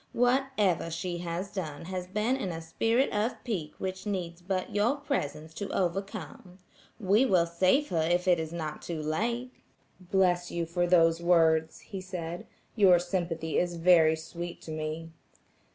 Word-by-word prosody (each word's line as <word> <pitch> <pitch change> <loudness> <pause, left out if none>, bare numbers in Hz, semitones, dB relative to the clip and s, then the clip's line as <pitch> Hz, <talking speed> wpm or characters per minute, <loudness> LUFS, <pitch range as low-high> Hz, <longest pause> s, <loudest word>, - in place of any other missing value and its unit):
Whatever 245 -9 +2
she 175 +1 -3
has 175 +3 -4
done 165 -6 -5
has 185 0 -4
been 215 +7 0
in 260 -8 -3
a 165 -2 -4
spirit 225 +11 +1
of 215 +4 -1
pique 175 -11 -3
which 190 +1 -5
needs 175 -4 -3
but 185 0 -3
your 210 +7 +2
presence 160 - -3
to 200 +4 -5
overcome. 185 -1 -3 0.4
We 205 +3 +4
will 180 -5 +4
save 185 - +2
her 165 -2 +1
if 175 +3 +1
it 175 -2 +4
is 160 -1 -4
not 155 -3 -5
too 170 -2 -4
late." 235 +11 -1 0.5
"Bless 180 -1 +1
you 170 -1 -2
for 175 +1 0
those 165 -1 +4
words," 160 -2 +3
he 195 -3 -7
said, 175 -2 -6 0.3
"your 190 -5 +6
sympathy 170 -3 -1
is 175 -1 -1
very 165 -2 +5
sweet 170 +2 -7
to 160 - -7
me." 155 +1 -4
175 Hz, 160 wpm, -29 LUFS, 165-195 Hz, 0.5 s, your